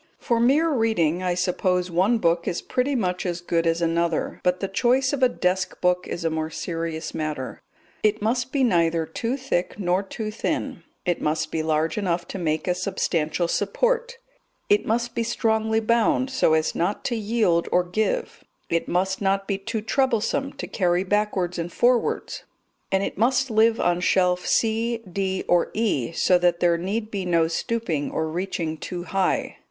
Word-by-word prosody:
For 235 Hz, -2 st, 0 dB
mere 290 Hz, +8 st, +3 dB
reading 220 Hz, -, +1 dB
I 180 Hz, -1 st, 0 dB
suppose 180 Hz, 0 st, 0 dB
one 190 Hz, +8 st, +3 dB
book 170 Hz, -4 st, +1 dB
is 170 Hz, -, -1 dB
pretty 270 Hz, +3 st, 0 dB
much 180 Hz, -6 st, -1 dB
as 175 Hz, -2 st, -2 dB
good 170 Hz, -1 st, 0 dB
as 165 Hz, +1 st, +1 dB
another; 170 Hz, 0 st, 0 dB
but 180 Hz, 0 st, +1 dB
the 195 Hz, -, -2 dB
choice 255 Hz, +7 st, +2 dB
of 280 Hz, -, -2 dB
a 255 Hz, -, +5 dB
desk 180 Hz, -4 st, -1 dB
book 180 Hz, 0 st, +1 dB
is 170 Hz, -, -4 dB
a 165 Hz, -, +1 dB
more 160 Hz, 0 st, -2 dB
serious 165 Hz, -1 st, -4 dB
matter. 150 Hz, -4 st, -4 dB, 0.4 s
It 215 Hz, 0 st, +2 dB
must 250 Hz, +4 st, -1 dB
be 275 Hz, -1 st, +1 dB
neither 170 Hz, -7 st, +2 dB
too 230 Hz, +11 st, -3 dB
thick 255 Hz, -10 st, -2 dB
nor 185 Hz, -1 st, +1 dB
too 215 Hz, +2 st, -5 dB
thin; 215 Hz, -, -3 dB, 0.2 s
it 175 Hz, -2 st, 0 dB
must 155 Hz, +1 st, -1 dB
be 160 Hz, -, -1 dB
large 155 Hz, +3 st, 0 dB
enough 175 Hz, -3 st, -1 dB
to 195 Hz, -, -5 dB
make 155 Hz, -1 st, -1 dB
a 180 Hz, -, +3 dB
substantial 175 Hz, -3 st, -1 dB
support; 485 Hz, -, 0 dB, 0.5 s
it 415 Hz, +1 st, +3 dB
must 235 Hz, +2 st, 0 dB
be -, -, -1 dB
strongly 220 Hz, -1 st, +1 dB
bound 235 Hz, +4 st, +2 dB
so 210 Hz, -11 st, +3 dB
as 155 Hz, 0 st, +1 dB
not 180 Hz, +5 st, -1 dB
to 240 Hz, -, 0 dB
yield 210 Hz, -6 st, +1 dB
or 180 Hz, -, +3 dB
give; 215 Hz, -, -2 dB, 0.3 s
it 170 Hz, 0 st, 0 dB
must 190 Hz, +2 st, 0 dB
not 195 Hz, 0 st, +1 dB
be 195 Hz, -1 st, -1 dB
too 220 Hz, +2 st, -3 dB
troublesome 250 Hz, +2 st, 0 dB
to -, -, -6 dB
carry 180 Hz, -1 st, +1 dB
backwards 195 Hz, -3 st, 0 dB
and 170 Hz, +1 st, -3 dB
forwards; 245 Hz, +4 st, +1 dB, 0.5 s
and 190 Hz, 0 st, +2 dB
it 195 Hz, -, -4 dB
must 260 Hz, +2 st, +2 dB
live 220 Hz, +1 st, +4 dB
on 175 Hz, 0 st, +2 dB
shelf 180 Hz, 0 st, +2 dB
C, 225 Hz, +1 st, +1 dB
D, 190 Hz, +1 st, -2 dB
or 175 Hz, -1 st, +3 dB
E, 205 Hz, -, 0 dB
so 180 Hz, +2 st, +3 dB
that 175 Hz, -1 st, +2 dB
there 170 Hz, -1 st, +3 dB
need 215 Hz, +5 st, -3 dB
be 200 Hz, -2 st, -2 dB
no 170 Hz, -2 st, +2 dB
stooping 170 Hz, -, -2 dB
or 160 Hz, -, -2 dB
reaching 165 Hz, -1 st, -3 dB
too 175 Hz, +2 st, -5 dB
high. 190 Hz, +1 st, -1 dB
190 Hz, 180 wpm, -24 LUFS, 170-225 Hz, 0.5 s, a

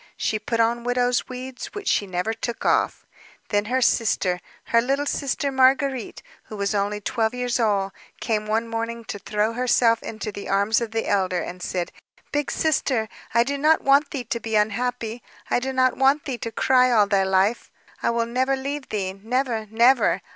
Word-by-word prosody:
She 215 Hz, -, -1 dB
put 230 Hz, +2 st, -2 dB
on 235 Hz, +1 st, +2 dB
widow's 245 Hz, +1 st, +1 dB
weeds, 255 Hz, 0 st, -6 dB
which 410 Hz, -1 st, -6 dB
she 205 Hz, -, +2 dB
never 185 Hz, +4 st, -2 dB
took 230 Hz, +1 st, -5 dB
off. -, -, +1 dB, 0.4 s
Then 205 Hz, -1 st, +1 dB
her 255 Hz, +3 st, +1 dB
sister, 195 Hz, -7 st, +1 dB, 0.2 s
her 230 Hz, -, +3 dB
little 275 Hz, +4 st, 0 dB
sister 280 Hz, 0 st, -1 dB
Marguérite, 265 Hz, -1 st, +2 dB, 0.2 s
who 215 Hz, -, -9 dB
was 200 Hz, +1 st, -1 dB
only 205 Hz, +1 st, -1 dB
twelve 220 Hz, +3 st, -1 dB
years 245 Hz, 0 st, -1 dB
old, 200 Hz, -4 st, +1 dB, 0.3 s
came 215 Hz, -2 st, -1 dB
one 225 Hz, +2 st, 0 dB
morning 230 Hz, 0 st, -4 dB
to 205 Hz, -, -6 dB
throw 210 Hz, +2 st, -1 dB
herself 235 Hz, -1 st, +3 dB
into 215 Hz, -1 st, -5 dB
the 200 Hz, 0 st, -8 dB
arms 200 Hz, +3 st, +2 dB
of 230 Hz, -, -2 dB
the 225 Hz, 0 st, -2 dB
elder, 185 Hz, -3 st, +1 dB
and 180 Hz, +1 st, -8 dB
said: 180 Hz, -1 st, -3 dB, 0.4 s
"Big 290 Hz, 0 st, -1 dB
Sister, 260 Hz, -8 st, 0 dB, 0.3 s
I 235 Hz, -, +6 dB
do 280 Hz, +3 st, -3 dB
not 310 Hz, +2 st, +3 dB
want 280 Hz, +1 st, +4 dB
thee 270 Hz, -4 st, -4 dB
to 235 Hz, -, -3 dB
be 225 Hz, 0 st, -3 dB
unhappy. 230 Hz, +2 st, -1 dB, 0.3 s
I -, -, +3 dB
do 265 Hz, +2 st, -3 dB
not 255 Hz, -1 st, +2 dB
want 270 Hz, +2 st, +3 dB
thee 255 Hz, -4 st, -4 dB
to 230 Hz, -, -4 dB
cry 255 Hz, +2 st, +3 dB
all 220 Hz, -4 st, +5 dB
thy 200 Hz, -1 st, +2 dB
life. 190 Hz, +4 st, +1 dB, 0.3 s
I -, -, +1 dB
will 235 Hz, 0 st, +1 dB
never 260 Hz, +3 st, 0 dB
leave 275 Hz, +1 st, -5 dB
thee, 195 Hz, -3 st, -2 dB
never, 225 Hz, +2 st, -2 dB
never! 235 Hz, +4 st, +3 dB
230 Hz, 190 wpm, -23 LUFS, 210-255 Hz, 0.4 s, I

